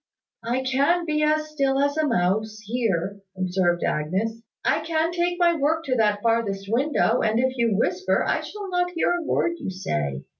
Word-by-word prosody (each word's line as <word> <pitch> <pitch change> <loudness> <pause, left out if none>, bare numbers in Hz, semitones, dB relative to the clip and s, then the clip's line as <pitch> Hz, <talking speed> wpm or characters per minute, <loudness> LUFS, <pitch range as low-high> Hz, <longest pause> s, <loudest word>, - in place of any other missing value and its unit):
"I 245 +3 -1
can 280 +7 +2
be 305 -1 0
as 305 0 +1
still 275 -3 +1
as 285 +1 +1
a 310 -1 +1
mouse 215 0 0
here," 200 -4 -1 0.2
observed 180 -1 0
Agnes. 195 +9 -1 0.2
"I - - +3
can 325 0 0
take 350 0 0
my 345 -1 +4
work 320 +2 +1
to 260 -4 -1
that 210 -3 +1
farthest 225 -4 0
window; 250 -1 +2
and 220 +1 +1
if 260 +1 +1
you 230 -5 +1
whisper, 370 - +1
I - - +1
shall 415 -1 -7
not 355 0 +1
hear 330 - +2
a 350 0 0
word 340 +2 0
you - - -4
say. 75 - -3
250 Hz, 185 wpm, -24 LUFS, 205-310 Hz, 0.2 s, my